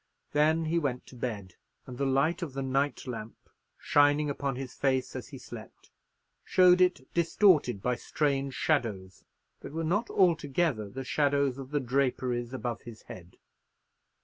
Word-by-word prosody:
Then 155 Hz, +2 st, +2 dB
he 165 Hz, +2 st, +1 dB
went 130 Hz, -5 st, -2 dB
to -, -, -14 dB
bed; 105 Hz, -7 st, -5 dB, 0.3 s
and 125 Hz, 0 st, -9 dB
the 140 Hz, -, +1 dB
light 140 Hz, +7 st, +1 dB
of 160 Hz, -6 st, -4 dB
the 135 Hz, 0 st, -3 dB
night 135 Hz, +1 st, -1 dB
lamp 115 Hz, -3 st, -6 dB, 0.4 s
shining 145 Hz, 0 st, +3 dB
upon 140 Hz, -1 st, -2 dB
his 130 Hz, -1 st, -6 dB
face 130 Hz, -2 st, 0 dB
as -, -, -6 dB
he -, -, -10 dB
slept, -, -, -12 dB, 0.5 s
showed 180 Hz, 0 st, +5 dB
it 180 Hz, -8 st, +1 dB
distorted 165 Hz, -, +3 dB
by 125 Hz, -1 st, 0 dB
strange 140 Hz, -2 st, -1 dB
shadows, 105 Hz, -11 st, -1 dB, 0.4 s
that -, -, -9 dB
were 165 Hz, +1 st, -2 dB
not 205 Hz, +9 st, 0 dB
altogether 155 Hz, -, +1 dB
the 135 Hz, +5 st, -6 dB
shadows 140 Hz, -1 st, +1 dB
of 135 Hz, -1 st, -8 dB
the 145 Hz, 0 st, 0 dB
draperies 125 Hz, -2 st, -1 dB
above 120 Hz, -2 st, -4 dB
his 115 Hz, -2 st, -11 dB
head. 90 Hz, 0 st, -12 dB
135 Hz, 155 wpm, -29 LUFS, 125-155 Hz, 0.5 s, showed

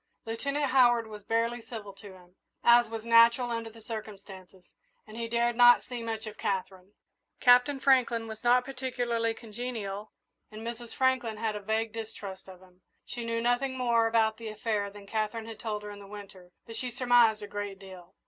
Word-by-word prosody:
Lieutenant 280 Hz, +5 st, -2 dB
Howard 240 Hz, -3 st, +5 dB
was 210 Hz, -1 st, -10 dB
barely 230 Hz, +2 st, 0 dB
civil 225 Hz, -3 st, -8 dB
to 200 Hz, 0 st, -13 dB
him, 180 Hz, -1 st, -18 dB, 0.3 s
as 235 Hz, -1 st, +6 dB
was 225 Hz, 0 st, -6 dB
natural 235 Hz, +1 st, +5 dB
under 230 Hz, -1 st, -3 dB
the 225 Hz, 0 st, -15 dB
circumstances, 195 Hz, -4 st, -9 dB, 0.4 s
and 215 Hz, -, -12 dB
he 230 Hz, 0 st, -3 dB
dared 235 Hz, +1 st, +1 dB
not 245 Hz, 0 st, +7 dB
see 245 Hz, -2 st, -6 dB
much 225 Hz, -1 st, -4 dB
of 215 Hz, -1 st, -9 dB
Katherine. 190 Hz, 0 st, -3 dB, 0.5 s
Captain 250 Hz, +3 st, +5 dB
Franklin 250 Hz, -4 st, +3 dB
was 220 Hz, 0 st, -9 dB
not 245 Hz, +1 st, +4 dB
particularly 245 Hz, -3 st, -2 dB
congenial, 215 Hz, -3 st, -6 dB, 0.4 s
and 215 Hz, +1 st, -9 dB
Mrs. 235 Hz, 0 st, -7 dB
Franklin 260 Hz, -4 st, +1 dB
had 220 Hz, -1 st, -2 dB
a -, -, -3 dB
vague 220 Hz, +2 st, -1 dB
distrust 205 Hz, -4 st, -8 dB
of 185 Hz, -1 st, -13 dB
him. 180 Hz, 0 st, -22 dB, 0.2 s
She 240 Hz, -, -6 dB
knew 230 Hz, 0 st, -2 dB
nothing 255 Hz, +2 st, 0 dB
more 235 Hz, -2 st, +2 dB
about 220 Hz, -1 st, +2 dB
the 230 Hz, -, -8 dB
affair 215 Hz, -1 st, -2 dB
than 200 Hz, 0 st, -13 dB
Katherine 220 Hz, +2 st, -2 dB
had 225 Hz, -1 st, -9 dB
told 210 Hz, -2 st, -4 dB
her 210 Hz, -, -7 dB
in 205 Hz, -, -10 dB
the 200 Hz, -, -12 dB
winter, 195 Hz, -3 st, -11 dB, 0.2 s
but 225 Hz, -, -9 dB
she 250 Hz, +2 st, -2 dB
surmised 240 Hz, -3 st, +3 dB
a -, -, -6 dB
great 205 Hz, -1 st, -5 dB
deal. 185 Hz, -3 st, -13 dB
225 Hz, 185 wpm, -29 LUFS, 205-240 Hz, 0.5 s, not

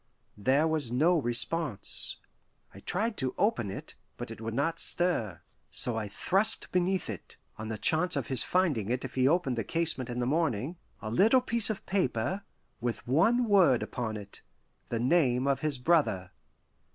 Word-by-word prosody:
There 135 Hz, +9 st, +2 dB
was 155 Hz, -7 st, -1 dB
no 160 Hz, +7 st, +3 dB
response. 125 Hz, +1 st, 0 dB, 0.6 s
I -, -, -12 dB
tried 220 Hz, +4 st, -1 dB
to 130 Hz, -2 st, -2 dB
open 195 Hz, -, 0 dB
it, 95 Hz, -, -8 dB, 0.2 s
but -, -, -7 dB
it -, -, -9 dB
would 115 Hz, 0 st, -4 dB
not 145 Hz, +5 st, -1 dB
stir. 175 Hz, -, -1 dB, 0.3 s
So 120 Hz, -, +3 dB
I 110 Hz, -2 st, -3 dB
thrust 195 Hz, -, +1 dB
beneath 180 Hz, +1 st, 0 dB
it, 105 Hz, -5 st, -8 dB, 0.2 s
on 110 Hz, -, -5 dB
the 110 Hz, 0 st, -4 dB
chance 160 Hz, -, +2 dB
of 140 Hz, -4 st, -2 dB
his 130 Hz, -1 st, +1 dB
finding 150 Hz, -, 0 dB
it 125 Hz, +2 st, -2 dB
if 135 Hz, -, -8 dB
he 130 Hz, 0 st, +2 dB
opened 150 Hz, -5 st, +1 dB
the -, -, -1 dB
casement 150 Hz, -2 st, +1 dB
in 120 Hz, -, -4 dB
the 125 Hz, -, -1 dB
morning, 150 Hz, -, -1 dB, 0.3 s
a 110 Hz, -, -4 dB
little 220 Hz, -, +4 dB
piece 235 Hz, -3 st, +2 dB
of 215 Hz, -, -4 dB
paper, 185 Hz, -, -1 dB, 0.4 s
with 120 Hz, 0 st, -4 dB
one 210 Hz, -, +3 dB
word 180 Hz, -, +4 dB
upon 110 Hz, -3 st, -4 dB
it 100 Hz, -1 st, -10 dB, 0.5 s
the 115 Hz, -, -2 dB
name 130 Hz, -1 st, +2 dB
of 140 Hz, -1 st, +1 dB
his 150 Hz, -2 st, -1 dB
brother. 115 Hz, -, +1 dB
135 Hz, 175 wpm, -29 LUFS, 115-175 Hz, 0.6 s, little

